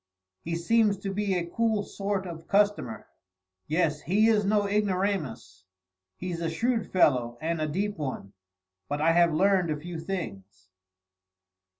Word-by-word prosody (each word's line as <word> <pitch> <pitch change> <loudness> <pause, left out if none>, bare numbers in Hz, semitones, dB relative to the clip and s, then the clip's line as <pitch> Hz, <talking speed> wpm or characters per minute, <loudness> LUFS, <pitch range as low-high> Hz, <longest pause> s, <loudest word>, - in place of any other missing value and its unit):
"He 165 0 -3
seems 210 +4 +2
to 195 0 -4
be 200 -1 0
a 175 -1 -1
cool 220 +3 0
sort 195 -1 -3
of 170 -3 -6
a - - -18
customer." 200 - +1 0.6
"Yes, 155 -1 +1
he 205 +8 +3
is 215 -2 +3
no 205 +1 +2
ignoramus. 195 - -1 0.5
He's 175 -2 -4
a 165 - 0
shrewd 225 +6 -1
fellow, 120 -9 +3
and 165 0 -2
a 155 - 0
deep 195 +4 -2
one; 130 -9 -5 0.6
but 145 - -2
I 160 +2 +4
have 170 0 +4
learned 185 +1 +3
a 150 - -1
few 165 +2 -7
things." 100 - -6
175 Hz, 155 wpm, -27 LUFS, 155-200 Hz, 0.6 s, I